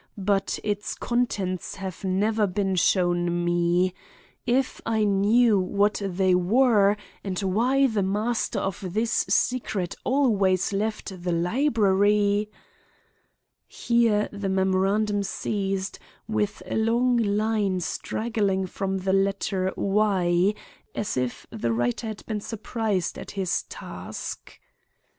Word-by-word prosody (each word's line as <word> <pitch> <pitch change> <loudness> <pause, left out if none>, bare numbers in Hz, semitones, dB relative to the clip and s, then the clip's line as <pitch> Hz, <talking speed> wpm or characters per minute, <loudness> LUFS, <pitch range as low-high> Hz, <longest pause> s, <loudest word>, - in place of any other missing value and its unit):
But 195 0 0
its 205 -1 -2
contents 200 -7 -2
have 190 -2 -7
never 205 +3 +1
been 195 0 -1
shown 175 -1 +2
me. 175 +1 +2 0.5
If 255 +2 +1
I 220 -1 +1
knew 210 +2 +4
what 200 +3 +1
they 190 -1 +1
were 205 +2 +4 0.3
and 190 -2 -3
why 245 +8 +2
the 220 -6 +1
master 210 +5 -1
of 195 0 -3
this 225 +1 +1 0.2
secret 210 -8 0
always 205 -9 +2
left 205 -2 -3
the 175 - -1
library—" 205 - +2 1.2
Here 230 -3 +2
the 200 -1 -3
memorandum 195 +2 +1
ceased 195 0 -2 0.3
with 210 -2 -1
a - - -3
long 240 +3 +2
line 210 -3 +1
straggling 200 0 -1
from 190 +1 -3
the 190 0 -1
letter 195 -1 0
y 195 -2 +2 0.4
as 205 - -2
if 125 -1 -2
the 115 - -2
writer 120 - -1
had 215 -1 -7
been 215 -2 -3
surprised 215 -4 -2
at - - -8
his 185 -2 0
task. - - -8
200 Hz, 115 wpm, -25 LUFS, 185-220 Hz, 1.2 s, knew